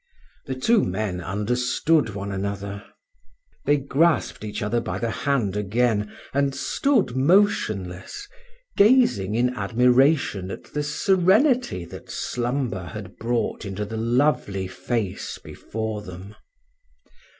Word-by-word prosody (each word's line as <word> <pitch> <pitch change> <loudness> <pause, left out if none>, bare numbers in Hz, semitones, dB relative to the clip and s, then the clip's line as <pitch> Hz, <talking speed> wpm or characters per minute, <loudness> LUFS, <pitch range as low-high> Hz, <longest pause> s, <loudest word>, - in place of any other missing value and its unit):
The 130 - -2
two 215 - +3
men 95 -1 -2
understood 125 - 0
one 100 0 -4
another. 100 +1 -4 0.8
They 145 - +4
grasped 140 -1 +1
each 105 +2 -4
other 115 +3 +1
by 105 -5 -4
the 115 +2 -2
hand 120 -9 0
again, 105 +1 0 0.2
and 140 0 +1
stood 220 - +1
motionless, 130 - +1 0.5
gazing 200 - +4
in 125 +2 +2
admiration 125 - +2
at - - -7
the 150 - -1
serenity 190 - +2
that - - -11
slumber 120 -6 -2
had 100 -1 -9
brought 120 +1 -1
into 100 0 -4
the 110 +2 -6
lovely 115 -4 +1
face 95 +2 -3
before 110 -1 -5
them. 95 +1 -10
115 Hz, 115 wpm, -24 LUFS, 100-140 Hz, 0.8 s, They